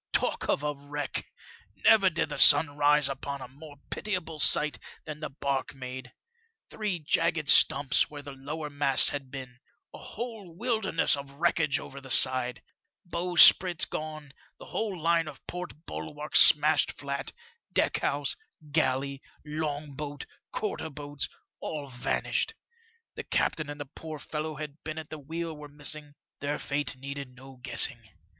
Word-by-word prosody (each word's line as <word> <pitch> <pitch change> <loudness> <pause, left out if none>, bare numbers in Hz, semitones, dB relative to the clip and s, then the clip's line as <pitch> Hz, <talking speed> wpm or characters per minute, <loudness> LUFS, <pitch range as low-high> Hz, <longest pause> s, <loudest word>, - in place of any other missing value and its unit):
Talk - - 0
of 145 - +2
a 150 0 0
wreck! 145 0 -5 0.5
Never 195 - +5
did 170 -1 -1
the - - -5
sun 145 -3 +8
rise 150 0 +4
upon 140 +1 -4
a 130 - -8
more 145 +3 -13 0.2
pitiable 180 -7 -3
sight 150 +1 +5 0.3
than 150 -1 -7
the 155 - -5
barque 135 -1 -3
made; 130 -1 -7 0.6
three 210 -4 -2
jagged 165 0 0
stumps 140 -2 +5
where 145 -1 -9
the 140 - -8
lower 145 +3 -6
masts 145 -2 +3
had 140 -2 -5
been; 130 -2 -9 0.3
a - - -9
whole 220 -8 -7
wilderness 220 -9 +1
of 140 0 -8
wreckage 155 -1 +1
over 140 +1 -10
the 135 - -12
side; 125 -1 +5 0.4
bowsprit 175 0 +6
gone, 155 -2 -6 0.2
the - - -11
whole 205 -5 -3
line 165 0 +2
of 145 -3 -10
port 175 -2 -7
bulwarks 150 0 0
smashed 150 +1 +5
flat, 140 -1 -4 0.4
deck - - +1
house, - - -1 0.4
galley, 140 -2 0 0.2
long 150 -1 -4
boat, 145 0 -6 0.3
quarter 200 -6 -3
boats 145 -1 -3 0.2
— - - -62
all 150 -3 -5
vanished. 135 - -1 0.6
The - - -6
captain 155 -2 0
and 145 0 -7
the 145 - -4
poor 155 +3 -8
fellow 155 +1 -4
who 150 - -8
had 150 0 -9
been 155 0 -5
at 160 -1 -7
the 155 - -6
wheel 165 +3 -5
were 150 -1 -10
missing, 145 0 -4 0.2
their 145 +1 -2
fate 145 0 -3
needed 140 -1 -7
no 130 0 -14
guessing. 120 +1 0
150 Hz, 155 wpm, -28 LUFS, 140-160 Hz, 0.6 s, sun